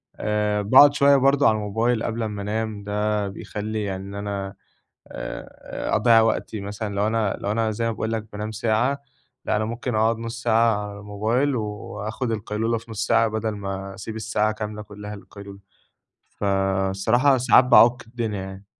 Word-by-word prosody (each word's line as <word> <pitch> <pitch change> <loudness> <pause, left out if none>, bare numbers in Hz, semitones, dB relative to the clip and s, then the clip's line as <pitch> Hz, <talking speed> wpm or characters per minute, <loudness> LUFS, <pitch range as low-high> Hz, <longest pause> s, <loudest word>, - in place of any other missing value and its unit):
آآ 105 0 0
باقعد 135 +7 +7
شوية 140 0 +5
برضه 140 +1 +4
على 110 - +4
الموبايل 110 +3 0
قبل 115 0 -2
أمّا 105 -2 -4
أنام، 105 0 -3
ده 105 0 -1
بيخلّي 105 +2 -5
يعني 95 -1 -4
إن 100 - -8
أنا 100 -1 -4 0.5
آآ - - -5
أضيّع 115 +1 +5
وقتي 110 -1 -1
مثلًا 100 +1 -5
لو 100 +1 +1
أنا 110 -2 0
لو 100 - -2
أنا 110 0 0
زي 115 +2 -2
ما 115 - +1
باقول 110 0 -3
لك 110 -1 -3
بانام 105 +1 -4
ساعة، 115 +5 0 0.5
لأ - - +1
أنا 110 - 0
ممكن 120 +2 -3
أقعد 110 +1 +2
نُص 115 +1 -6
ساعة 110 -3 +2
على 100 0 -9
الموبايل 110 +7 0
وآخُد 110 +2 -4
القيلولة 110 +2 -1
في 115 +1 -11
نُص 110 +1 -2
ساعة 115 - +4
بدل 110 0 -2
ما 95 -1 -5
أسيب 110 +3 -7
الساعة 110 -1 0
كاملة 105 0 -5
كلّها 105 0 -8
للقيلولة، 100 -1 -12 0.8
فالصراحة 95 +6 +2
ساعات 125 +1 +6
بأعُك 125 0 +5
الدنيا 115 -4 -3
يعني. 95 +1 -9
110 Hz, 170 wpm, -23 LUFS, 105-115 Hz, 0.8 s, باقعد